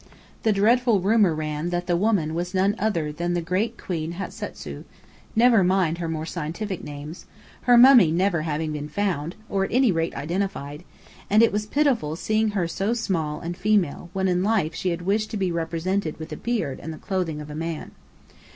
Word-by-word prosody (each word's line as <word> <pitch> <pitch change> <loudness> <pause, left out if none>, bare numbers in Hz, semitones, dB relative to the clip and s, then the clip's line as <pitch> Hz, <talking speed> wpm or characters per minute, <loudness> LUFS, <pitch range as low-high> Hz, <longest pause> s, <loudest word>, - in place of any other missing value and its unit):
The 220 - +2
dreadful 225 +2 +3
rumour 200 -3 +3
ran 155 +1 -3
that 175 0 -2
the 175 - +1
woman 180 -5 +1
was 175 +3 -3
none 195 +2 +3
other 170 -8 0
than 175 +3 -2
the - - +1
great 200 +7 -1
Queen 165 -2 -4
Hatasu 190 +3 -7 0.5
(never 230 -3 +5
mind 180 -2 +2
her 165 -2 -3
more 160 -1 -3
scientific 175 +4 -4
names), 150 +3 -8 0.4
her 245 -1 +6
mummy 240 - +8
never 175 0 +1
having 155 0 -2
been 150 0 -5
found, 170 -3 -2
or, 195 -2 0
at - - -3
any 250 -2 +4
rate, 165 -1 -1
identified: 155 -1 -3 0.5
and 215 +3 +5
it 230 - +4
was 210 +1 -2
pitiful 250 - +1
seeing 215 +5 +1
her 175 -3 +1
so 195 +7 -1
small 165 -10 -2
and 175 +1 -4
female, 185 -5 0
when 190 0 0
in 180 -1 +1
life 195 -6 +1
she 185 - -2
had 175 0 -3
wished 210 +3 0
to 215 - -4
be 190 -2 0
represented 170 +1 -2
with 160 +1 -7
a - - -3
beard 230 - -2
and 160 - -6
the 155 - -7
clothing 180 -6 -2
of 150 0 -8
a - - -7
man. 165 0 -4
180 Hz, 195 wpm, -24 LUFS, 160-205 Hz, 0.5 s, mummy